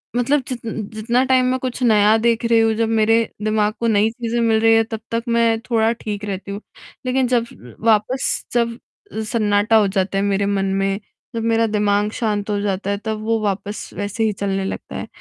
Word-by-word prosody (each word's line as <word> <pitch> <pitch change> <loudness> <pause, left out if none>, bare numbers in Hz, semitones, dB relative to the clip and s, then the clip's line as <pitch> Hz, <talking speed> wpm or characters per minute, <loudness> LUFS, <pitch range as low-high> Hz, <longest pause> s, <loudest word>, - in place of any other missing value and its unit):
मतलब 270 +4 +2
जित 245 -3 -6 0.3
जितना 235 +4 +1
टाइम 260 -1 +3
मैं 260 - 0
कुछ 255 0 -4
नया 215 -2 +5
देख 230 -1 +2
रही 230 -1 +4
हूँ 225 0 +3
जब 225 0 0
मेरे 225 0 +3 0.3
दिमाग 215 0 +1
को 235 - 0
नई 215 -1 +3
चीज़ें 235 0 -3
मिल 225 -1 +3
रही 225 0 +5
हैं, 225 - +4
तब 225 -1 -5
तक 230 0 -1
मैं 230 -1 +2
थोड़ा 225 -1 +3
ठीक 210 -1 -4
रहती 200 -1 -5
हूँ। 200 +1 -5 0.4
लेक़िन 255 0 +1
जब 240 -2 +1 0.4
वापस 225 +4 +1
जब 235 -1 0 0.5
सन्नाटा 210 -1 +2
हो 210 - +4
जाता 195 0 -1
है 195 - +1
मेरे 200 0 +1
मन 200 -1 0
में, 195 +1 0 0.4
जब 225 - -2
मेरा 230 0 +2
दिमाग 210 -1 +1
शांत 210 -2 -1
हो 205 - 0
जाता 200 -1 -2
है 200 - 0
तब 220 -1 -2
वो 225 0 +1
वापस 205 +1 -3
वैसे 205 +2 -3
ही 215 -1 +1
चलने 195 -1 -2
लगता - - -6
है। - - -5
220 Hz, 205 wpm, -20 LUFS, 205-230 Hz, 0.5 s, नया